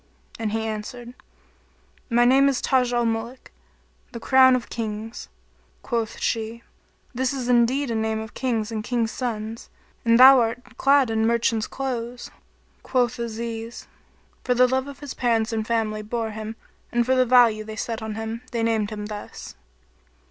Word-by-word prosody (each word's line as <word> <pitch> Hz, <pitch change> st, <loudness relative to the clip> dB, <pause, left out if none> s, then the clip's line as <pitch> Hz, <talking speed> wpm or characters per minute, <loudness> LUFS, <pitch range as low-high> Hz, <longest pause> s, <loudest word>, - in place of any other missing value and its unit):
and 220 Hz, -2 st, -2 dB
he 220 Hz, 0 st, -2 dB
answered, 230 Hz, +3 st, -6 dB, 1.0 s
"My 240 Hz, 0 st, +4 dB
name 270 Hz, +3 st, +5 dB
is 270 Hz, -, 0 dB
Taj 255 Hz, -2 st, +1 dB
al 240 Hz, -1 st, +1 dB
Muluk, 230 Hz, +3 st, -4 dB, 0.6 s
the 235 Hz, -, -6 dB
Crown 260 Hz, +1 st, +5 dB
of 250 Hz, -, -3 dB
Kings." 220 Hz, 0 st, -5 dB, 0.5 s
Quoth 230 Hz, -2 st, -2 dB
she, 225 Hz, +1 st, -2 dB, 0.5 s
"This 260 Hz, +2 st, -1 dB
is 255 Hz, -3 st, -4 dB
indeed 250 Hz, +2 st, +2 dB
a -, -, -1 dB
name 220 Hz, 0 st, -1 dB
of 220 Hz, 0 st, -8 dB
Kings 230 Hz, -4 st, -2 dB
and 215 Hz, -1 st, -3 dB
King's 230 Hz, -1 st, -1 dB
sons 225 Hz, -2 st, -5 dB, 0.3 s
and 230 Hz, 0 st, +4 dB
thou 265 Hz, +1 st, +10 dB
art 235 Hz, +1 st, -3 dB
clad 275 Hz, -3 st, +3 dB
in 220 Hz, 0 st, +1 dB
merchant's 230 Hz, -1 st, +1 dB
clothes." 245 Hz, -2 st, -5 dB, 0.5 s
Quoth 250 Hz, -1 st, 0 dB
Aziz, 230 Hz, 0 st, -5 dB, 0.6 s
"for 250 Hz, -, +1 dB
the 250 Hz, +1 st, +5 dB
love 265 Hz, +3 st, -3 dB
his 290 Hz, -2 st, -6 dB
parents 230 Hz, -2 st, 0 dB
and 220 Hz, -1 st, -2 dB
family 220 Hz, -2 st, -1 dB
bore 225 Hz, +1 st, -3 dB
him 220 Hz, +1 st, -6 dB, 0.4 s
and 240 Hz, -1 st, +1 dB
for 260 Hz, -, +2 dB
the 255 Hz, 0 st, +4 dB
value 235 Hz, -3 st, +4 dB
they 215 Hz, 0 st, -8 dB
set 225 Hz, 0 st, -4 dB
on 220 Hz, -1 st, -5 dB
him, 225 Hz, +1 st, -5 dB
they 230 Hz, -2 st, -1 dB
named 220 Hz, -2 st, +1 dB
him 210 Hz, -1 st, -6 dB
thus." 210 Hz, -1 st, -8 dB
230 Hz, 160 wpm, -24 LUFS, 220-250 Hz, 1.0 s, thou